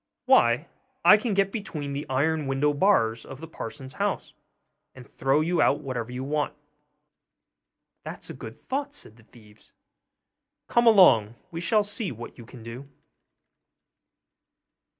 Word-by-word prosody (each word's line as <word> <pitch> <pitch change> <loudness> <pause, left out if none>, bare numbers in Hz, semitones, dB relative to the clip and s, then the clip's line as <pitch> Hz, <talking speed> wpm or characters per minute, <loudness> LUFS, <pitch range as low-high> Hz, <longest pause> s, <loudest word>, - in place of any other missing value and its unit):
'Why, 120 +7 +4 0.4
I - - +10
can 215 -1 -1
get 195 0 +2
between 155 -10 -5
the 140 0 -5
iron 150 +3 0
window 140 +2 +1
bars 130 - +2
of 135 - -10
the 165 - -8
parson's 130 -3 -8
house, - - -2 0.6
and 125 -2 -12
throw 135 +3 +1
you 170 +2 +1
out 145 - +3
whatever 125 -4 -4
you 125 +1 -5
want.' 150 +1 -2 1.5
'That's - - -8
a - - -7
good - - -10
thought,' 285 +2 -4
said 110 - -9
the 115 - -19
thieves; 105 -3 -20 0.9
'come 240 0 +3
along, 125 - +6 0.2
we 165 0 -5
shall 210 +4 +2
see 205 - -4
what 120 -1 -9
you 115 - -11
can 120 -2 -12
do. 120 +4 -9
140 Hz, 145 wpm, -26 LUFS, 120-185 Hz, 1.5 s, I